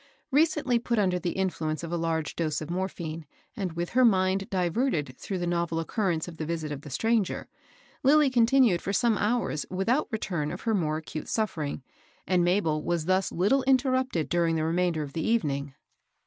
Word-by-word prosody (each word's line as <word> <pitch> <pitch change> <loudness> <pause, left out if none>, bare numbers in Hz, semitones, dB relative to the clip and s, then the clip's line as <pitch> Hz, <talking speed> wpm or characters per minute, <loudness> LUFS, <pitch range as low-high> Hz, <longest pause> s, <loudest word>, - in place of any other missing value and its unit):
Recently 285 -4 +2
put 235 0 -1
under 185 -3 +2
the 175 0 -2
influence 165 -5 -2
of 165 - -5
a - - 0
large 165 -2 -1
dose 155 -3 -1
of 155 +1 -6
morphine, 170 -4 -4 0.3
and 190 -7 -3
with 170 +1 -3
her 255 +1 +4
mind 195 -2 +3
diverted 175 - 0
through 195 - -4
the 175 - -2
novel 170 -1 0
occurrence 170 -1 -1
of 170 -2 -9
the 155 - -3
visit 160 -2 -3
of 140 -1 -5
the 150 - -10
stranger, 220 - 0 0.5
Lilly 285 0 +5
continued 240 -5 +4
for 200 - -3
some 230 +2 +3
hours 210 -8 0
without 210 +10 0
return 175 - -2
of 180 - -6
her 225 - 0
more 155 -6 0
acute 155 0 -6
suffering, 155 - -2 0.4
and 180 -2 +2
Mabel 175 -4 +1
was 170 -1 -1
thus 185 +1 +1
little 205 +10 +2
interrupted 260 - +2
during 170 -1 +1
the 155 - 0
remainder 170 -1 0
of 140 -1 -8
the 165 - -2
evening. 140 -12 0
180 Hz, 185 wpm, -27 LUFS, 160-225 Hz, 0.5 s, Lilly